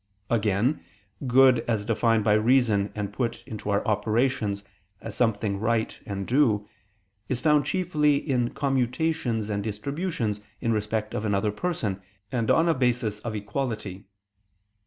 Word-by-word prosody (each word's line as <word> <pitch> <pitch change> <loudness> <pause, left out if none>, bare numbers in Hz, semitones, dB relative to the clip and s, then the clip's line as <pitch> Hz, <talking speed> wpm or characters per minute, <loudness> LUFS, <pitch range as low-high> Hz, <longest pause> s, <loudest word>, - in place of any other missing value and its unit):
Again, 110 +5 +1 0.4
good 130 0 +6
as 110 -3 0
defined 115 -1 +2
by 105 0 +4
reason 110 -2 +3
and 105 -1 -4
put 120 -2 -2
into 105 -2 -6
our 100 0 +1
operations 105 -1 0 0.4
as - - -7
something 105 -4 0
right 110 +1 0
and 100 -2 -3
due, 115 -5 +2 0.6
is 130 - 0
found 150 -1 +3
chiefly 150 -4 +2
in 130 -4 0
commutations 135 -3 0
and 100 -1 -1
distributions 115 - -3 0.2
in 115 - 0
respect 110 0 -2
of 105 - -2
another 105 0 +1
person, 105 - -2 0.3
and 115 -4 -1
on 165 +1 +4
a 165 - +4
basis 120 -5 0
of 110 -1 -5
equality. 105 -2 -4
115 Hz, 135 wpm, -26 LUFS, 105-130 Hz, 0.6 s, good